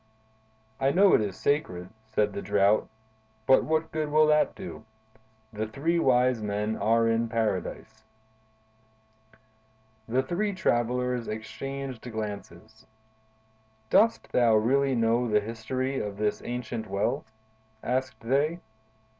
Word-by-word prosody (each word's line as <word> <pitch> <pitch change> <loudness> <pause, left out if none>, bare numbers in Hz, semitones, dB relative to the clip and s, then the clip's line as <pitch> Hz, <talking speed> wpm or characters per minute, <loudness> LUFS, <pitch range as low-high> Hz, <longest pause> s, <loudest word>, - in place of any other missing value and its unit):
"I 135 - +2
know 190 +6 +5
it - - +5
is 100 -3 -3
sacred," 95 - -1 0.2
said 105 -2 0
the 100 - -4
Drought, 100 +1 +2 0.6
"but 130 +3 +5
what 160 +1 -1
good 155 -1 -2
will 155 +1 +5
that 150 0 +3
do? 185 - -8 0.7
The 110 +1 -3
three 160 +10 0
wise 125 -4 +3
men 105 +1 -2
are 115 +1 +2
in 115 0 +1
Paradise." 110 0 -3 2.0
The 125 +3 +1
three 200 +9 -1
travelers 125 -5 0
exchanged 130 +4 -6
glances. 110 -1 -7 1.0
"Dost 225 +2 +3
thou 120 -3 +4
really 135 +5 +2
know 115 +1 +2
the 105 -1 +4
history 130 +5 -3
of 100 -1 -4
this 105 0 -1
ancient 120 -2 -4
well?" 100 +1 -1 0.6
asked 125 -2 -2
they. 145 +8 +1
115 Hz, 120 wpm, -27 LUFS, 110-135 Hz, 2.0 s, know